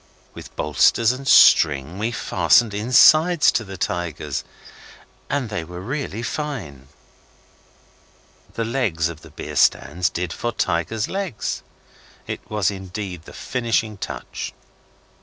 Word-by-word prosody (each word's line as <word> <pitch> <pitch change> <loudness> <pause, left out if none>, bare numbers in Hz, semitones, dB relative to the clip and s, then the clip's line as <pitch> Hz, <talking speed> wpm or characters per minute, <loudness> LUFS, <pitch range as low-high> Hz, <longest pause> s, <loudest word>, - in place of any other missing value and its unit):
With - - -12
bolsters 75 - +3
and 130 +2 -7
string 75 +5 +5
we 110 +2 0
fastened 110 +1 +2
insides 150 - +5
to 110 - -1
the 95 -2 -9
tigers 80 -5 -3 0.9
and 140 -5 -1
they 105 -5 -3
were 90 +2 -9
really 120 +1 -4
fine. 110 - -5 1.7
The 115 - -1
legs 105 -10 0
of 80 -2 -9
the 80 - -14
beer 75 - -8
stands 80 +5 +2
did 85 +1 -4
for 120 0 -3
tigers' 90 +7 -1
legs. 190 - -3 0.6
It - - -5
was 105 -3 +1
indeed 95 -3 -7
the - - -12
finishing 115 -3 -1
touch. - - -6
100 Hz, 120 wpm, -22 LUFS, 85-120 Hz, 1.7 s, string